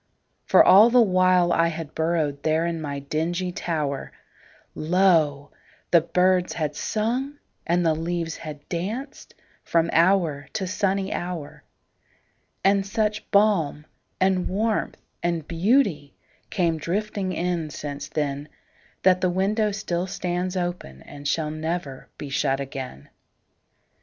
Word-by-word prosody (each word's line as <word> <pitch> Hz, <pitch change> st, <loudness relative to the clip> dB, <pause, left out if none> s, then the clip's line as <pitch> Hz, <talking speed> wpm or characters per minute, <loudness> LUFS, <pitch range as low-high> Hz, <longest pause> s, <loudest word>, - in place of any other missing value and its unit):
For -, -, +7 dB
all 210 Hz, +5 st, +8 dB
the 250 Hz, +1 st, +5 dB
while 185 Hz, -4 st, +4 dB
I 165 Hz, 0 st, +3 dB
had 165 Hz, -2 st, -5 dB
burrowedThere 160 Hz, 0 st, 0 dB
in 165 Hz, -1 st, -3 dB
my 145 Hz, -2 st, -4 dB
dingy 165 Hz, +6 st, -2 dB
tower, 150 Hz, -6 st, -3 dB, 0.6 s
Lo! 160 Hz, -5 st, +2 dB, 0.4 s
the 170 Hz, -, +6 dB
birds 180 Hz, +2 st, +2 dB
had 150 Hz, -3 st, -2 dB
sung 245 Hz, -, -2 dB, 0.3 s
and 175 Hz, +1 st, +2 dB
the 160 Hz, -, +4 dB
leaves 165 Hz, 0 st, -3 dB
had 150 Hz, -3 st, -9 dB
dancedFrom 185 Hz, -, -3 dB
hour 165 Hz, -5 st, +2 dB
to 195 Hz, -, -2 dB
sunny 195 Hz, 0 st, -1 dB
hour. 175 Hz, -4 st, -5 dB, 1.0 s
And 195 Hz, 0 st, +4 dB
such 210 Hz, +2 st, -2 dB
balm 195 Hz, -8 st, +2 dB, 0.3 s
and 185 Hz, -1 st, +2 dB
warmth 215 Hz, +3 st, -1 dB, 0.2 s
and 170 Hz, -3 st, -1 dB
beautyCame 170 Hz, -, 0 dB
drifting 195 Hz, +3 st, -2 dB
in 175 Hz, -3 st, -2 dB
since 145 Hz, -1 st, -6 dB
then, 145 Hz, -1 st, -3 dB, 0.5 s
That 185 Hz, -1 st, +4 dB
the 185 Hz, -, +2 dB
window 205 Hz, +4 st, +1 dB
still 185 Hz, -3 st, -2 dB
stands 180 Hz, 0 st, -3 dB
openAnd 145 Hz, -, -5 dB
shall 150 Hz, +1 st, 0 dB
never 155 Hz, -3 st, -4 dB
be 145 Hz, -, -7 dB
shut 135 Hz, 0 st, 0 dB
again. 130 Hz, -, -7 dB
175 Hz, 115 wpm, -24 LUFS, 155-190 Hz, 1.0 s, all